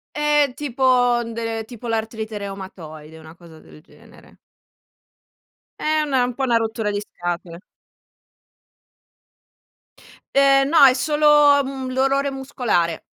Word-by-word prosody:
È 295 -2 +2
tipo 250 -3 +1
de 230 -1 -5
tipo 240 0 -10
l'artrite 220 -1 -4
reumatoide, 165 -6 -10
una 160 +1 -14
cosa 170 -2 -16
del - - -17
genere. 170 - -20 1.4
È 310 0 +1
una 270 -4 +1
un 250 - -4
po' 270 - -4
una 240 -3 +2
rottura 225 -1 -2
di 205 - -2
scatole. 175 -3 -6 2.8
Ehm, 275 0 +4
no, 315 -2 +5
è 255 - +6
solo 300 +3 0 0.4
un 265 -1 -6
dolore 270 +2 0
muscolare. 245 -11 -2
240 Hz, 115 wpm, -21 LUFS, 200-270 Hz, 2.8 s, è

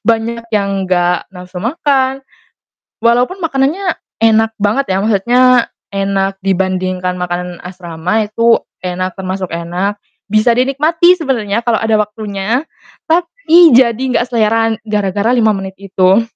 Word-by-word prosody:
banyak 230 +1 0
yang 200 -1 +1 0.2
gak 175 -1 +1
nafsu 180 -1 -9
makan, 270 0 0 0.9
walaupun 245 +10 +2
makanannya 330 +3 0 0.3
enak 225 0 +4
banget 210 +6 0
ya, 190 - +1
maksudnya 225 +4 +2 0.5
enak 195 0 -1
dibandingkan 185 -1 -1
makanan 180 0 -4
asrama 180 +3 -3
itu 230 +2 +3 0.2
enak, 185 0 -3
termasuk 185 -1 -4
enak, 180 +5 -3 0.3
bisa 215 +3 +3
dinikmati 305 +7 +3
sebenernya 235 - -1
kalau 235 -2 +1
ada 225 0 +1
waktunya, 210 +2 -2 0.5
tapi 340 - +4
jadi 235 -1 +4
gak 245 - 0
selera 225 -1 +2
gara-gara 205 0 0
5 225 -3 +3
menit 190 0 -6
itu. 195 +1 +2
215 Hz, 120 wpm, -14 LUFS, 190-245 Hz, 0.9 s, enak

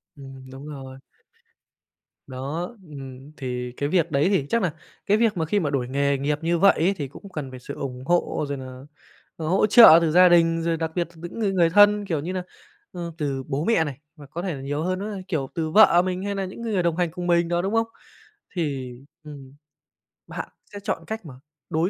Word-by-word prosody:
Ừm, 135 -1 -11
đúng 135 +3 -10
rồi. 135 -2 -9 1.3
Đó, 135 +5 -4 0.3
ừm, 135 0 -10
thì 125 -2 -4
cái 145 0 -1
việc 170 -4 +1
đấy 145 +6 +2
thì 185 -9 +1
chắc 230 - +1
nà 175 -5 0 0.3
cái 210 +1 +3
việc 220 -4 +2
mà 160 - 0
khi 205 +6 +1
mà 155 - -1
đổi 130 -3 -1
nghề 140 +1 +1
nghiệp 145 +2 -1
như 170 +1 +1
vậy 200 +1 +7
ấy 180 +5 +2
thì 145 -3 -3
cũng 195 +9 -13
cần 145 -6 -6
phải 130 - -9
sự - - -8
ủng 130 -2 -6
hộ 175 -2 +1
rồi 140 -1 -3
nà, 130 - -8 0.7
à, 160 - -5
hỗ 190 +6 +3
trợ 215 -7 +9
từ 160 -2 +1
gia 180 +1 +7
đình, 165 -1 +4
rồi 165 0 0
đặc 160 -1 -3
biệt 175 -2 0
từ 160 - -15
những 175 +6 -7
người 205 -3 +1
người 175 -3 +3
thân, 205 +2 +5
kiểu 165 -5 -1
như 175 +6 -4
nà, 185 -1 -3 0.5
ơ, 170 -2 -6
từ 140 -4 -2
bố 140 +3 -2
mẹ 225 -8 +3
này, 145 -4 -5 0.2
hoặc 145 -2 -13
có 170 - -3
thể 180 -2 -3
nà 135 - -7
nhiều 145 +2 -3
hơn 185 +1 -1
nữa, 205 0 -4
kiểu, 150 -7 -2
từ 160 -2 -2
vợ 175 -4 +7
mình 185 +1 -3
hay 200 0 -2
nà 195 -1 -2
những 190 +5 -8
cái 225 -2 -2
người 180 -3 +1
đồng 170 -1 0
hành 175 -3 0
cùng 180 0 -5
mình 170 -1 +3
đó, 175 0 0
đúng 195 +4 -2
không? 225 0 +2 0.7
Thì, 140 -7 -3 0.3
ừm, 140 -3 -11 0.8
bạn - - -6 0.2
sẽ 205 - -6
chọn 205 - -2
cách 220 -3 -5
mà 145 - -9 0.4
đối 165 +4 +1
165 Hz, 235 wpm, -24 LUFS, 140-185 Hz, 1.3 s, trợ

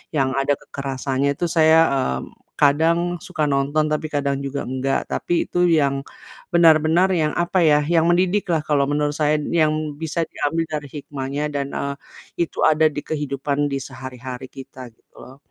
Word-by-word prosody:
yang 135 -2 +1
ada 135 +1 +1
kekerasannya 135 0 -3
itu 175 - -1
saya, 160 -1 +5
mmm, 65 - -2 0.3
kadang 160 +4 +4 0.2
suka 155 - -3
nonton, 140 +3 +1
tapi 155 +1 -1
kadang 140 -1 0
juga 140 +1 -3
enggak. 130 +1 -1
Tapi 175 - 0
itu 175 0 +2
yang 140 -4 +2 0.5
benar-benar 165 +2 +5
yang, 155 -3 +1
apa 175 +2 +1
ya, 150 -1 +5
yang 165 0 +2
mendidik 185 +3 +2
lah 160 - +1
kalau 140 -2 +2
menurut 145 0 +1
saya, 150 0 +2 0.3
yang 155 -1 +3 0.3
bisa 160 +1 -2
diambil 165 +3 -1
dari 150 -2 -3
hikmahnya 140 +1 -4
dan, 140 -1 -1
eee. 140 0 -3 0.5
Itu 170 - -8
ada 155 0 +4
di 145 - -3
kehidupan 145 -1 -2
di 140 - -1
sehari-hari 130 -1 -8
kita 130 -1 -10
gitu - - -40
loh. 130 - -12
145 Hz, 165 wpm, -21 LUFS, 135-160 Hz, 0.5 s, saya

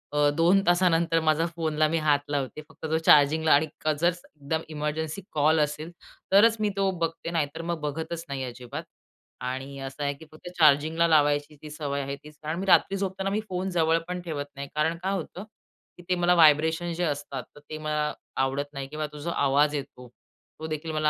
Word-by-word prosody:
अ, 145 0 +4
2 175 +4 +5
तासानंतर 170 -2 +3
माझा 160 0 +2
फोनला 155 -2 +1
मी 165 - +1
हात 150 -2 +3
लावते. 145 0 -2
फक्त - - -10
तो 160 +1 +1
चार्जिंगला 155 +2 +5
आणि 155 +2 +4 0.3
जर 170 - +3
एकदम 160 -3 -5
इमर्जन्सी 155 +3 -3
कॉल 155 +1 +3
असेल 150 +2 -1 0.4
तरच 220 +3 +6
मी 210 -1 +1
तो 195 0 +2
बघते 165 +1 -3
नाही 160 -4 +1
तर 165 - -4
मग 170 -1 -1
बघतच 160 +3 -4
नाही 135 -1 -3
अजिबात 125 -1 -7 0.6
आणि 130 +2 -5
असं 135 +2 -6
आहे, 140 - 0
की 140 +3 -14
फक्त 155 +3 -10
चार्जिंगला 155 +2 +4
लावायची 145 -1 +2
ती 155 - -9
सवय 145 -2 -3
आहे 140 0 -4
तीच 150 0 -14
कारण 155 +3 -3
मी 195 - -3
रात्री 195 +1 +4
झोपताना 195 0 -2
मी 205 +2 0
फोन 185 +1 -2
जवळ 165 -2 +2
पण 180 0 -4
ठेवत 155 -5 -4
नाही. 140 0 -6
कारण 160 +2 +1
काय 190 +1 0
होतं? 185 0 -5 0.5
की 175 - -13
ते 180 - +3
मला 175 0 +3
व्हायब्रेशन 160 +2 +4
जे 175 +2 -2
असतात 145 -4 -3
तर - - -12
ते 155 - -5
मला 150 -1 -1 0.3
आवडत 135 +2 -1
नाही 135 -1 -5
किंवा 155 +2 -4
तो 150 - -9
जो 160 +4 -4
आवाज 145 -1 +2
येतो, 125 -3 -7 0.5
तो 160 - -5
देखील 155 +1 -4
मला 155 -1 +1
155 Hz, 200 wpm, -26 LUFS, 145-170 Hz, 0.6 s, तरच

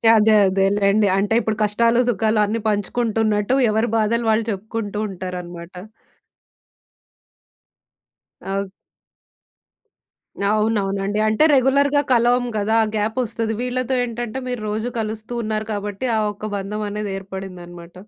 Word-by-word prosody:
అదే 220 0 +5
అదేలెండి. 200 +2 +2
అంటే 205 +2 +1
ఇప్పుడు 220 -2 -2
కష్టాలు 230 +3 +2
సుఖాలు 220 0 +1
అన్ని 225 +3 -2
పంచుకుంటున్నట్టు 215 +1 0
ఎవరి 220 +2 +1
బాధలు 230 +2 +1
వాళ్ళు 220 0 +1
చెప్పుకుంటూ 210 +1 -4
ఉంటారన్నమాట. 180 -1 -7 2.7
అవ్ 195 0 -3 1.8
అవునవునండి. 205 -2 0
అంటే 215 +7 +3
రెగ్యులర్‌గా 280 +2 +3
కలవము 245 +1 +3
కదా! 210 +2 0
ఆ - - +1
గ్యాప్ 215 +3 -1
వస్తది. 225 -1 -3
వీళ్ళతో 255 +1 -1
ఏంటంటే, 240 +1 -4
మీరు 245 -3 -3
రోజు 220 +3 -2
కలుస్తూ 220 +1 -5
ఉన్నారు 215 0 -2
కాబట్టి 205 +4 -3
ఆ - - +2
ఒక్క 210 +1 -7
బంధం 210 +2 -4
అనేది 210 -1 -3
ఏర్పడిందన్నమాట. 185 -1 -9
215 Hz, 115 wpm, -21 LUFS, 200-230 Hz, 2.7 s, అదే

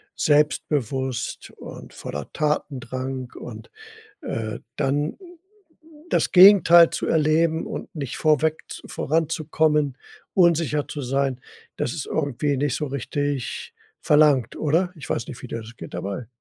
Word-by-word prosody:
selbstbewusst 140 -4 0
und - - -11
voller 70 -1 -6
Tatendrang. 130 -4 -3
Und, - - -9 0.5
äh, 110 - -4 0.2
dann 145 +3 0 0.9
das - - +1
Gegenteil 180 -3 +8
zu - - -3
erleben 160 +1 +2
und - - -7
nicht 140 -5 -5
vorweg 155 0 +2
z - - -8
voranzukommen, 155 -2 0 0.4
unsicher 165 -5 +2
zu 145 - -6
sein, 135 0 -1 0.4
dass 120 - -2
es 155 - -4
irgendwie 145 -1 -1
nicht 145 0 0
so 150 - -2
richtig 140 - -3 0.3
verlangt, 150 -5 +4
oder? 165 +5 +1
Ich 150 -3 -10
weiß 115 - -2
nicht, 120 - -9
wie - - -8
dir 115 - -5
das 115 +1 -12
geht - - -10
dabei. 100 +4 -5
145 Hz, 130 wpm, -23 LUFS, 130-155 Hz, 0.9 s, Gegenteil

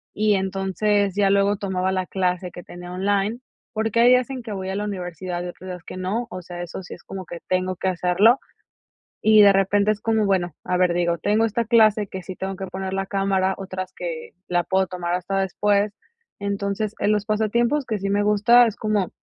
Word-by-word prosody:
y 215 0 +3
entonces 195 +1 0
ya 200 -1 +3
luego 200 +1 +3
tomaba 190 -1 -1
la 185 -1 -1
clase 180 -1 -1
que 175 - -10
tenía 175 0 -10
online, 200 +4 0 0.3
porque, 225 +1 -1
hay 240 +1 +7
días 250 +1 +4
en 255 -2 -5
que 225 -2 -8
voy 190 -1 -4
a - - -3
la 205 +1 -2
universidad, 180 -2 -4
y - - -5
otros 185 +1 -11
días 180 -1 -7
que - - -9
no, 205 +6 -2
o 185 - -6
sea, 175 0 -7
eso 175 +2 -7
sí 180 - -9
es - - -19
como 190 -1 -7
que 175 - -7
tengo 185 0 0
que 190 - -3
hacerlo. 185 +7 +3 0.8
Y 215 -1 +6
de 200 -1 +8
repente 200 +2 +3
es 210 - -1
como, 220 -2 +1
bueno, 180 -4 +1
a 180 - 0
ver, 180 -1 +3
digo, 170 -1 +1
tengo 215 +6 +2
esta 230 +2 -1
clase 215 -2 +4
que 190 - -7
sí 185 +1 -8
tengo 190 0 -4
que 190 0 -5
poner 190 0 -5
la 195 0 -2
cámara, 195 -1 +1
otras 185 -1 -6
que 165 -3 -6 0.2
la 175 -1 +1
puedo 190 0 +1
tomar 175 -1 -3
hasta 190 +2 -2
después. 200 +2 +1 0.4
Entonces, 200 +1 -2
en 205 - +2
los 210 -1 0
pasatiempos 235 +6 +1
que 215 -3 -2
sí 195 +1 -2
me 205 +1 +2
gusta 215 +4 +5
es 220 - -3
como 210 -4 0
195 Hz, 220 wpm, -23 LUFS, 185-210 Hz, 0.8 s, de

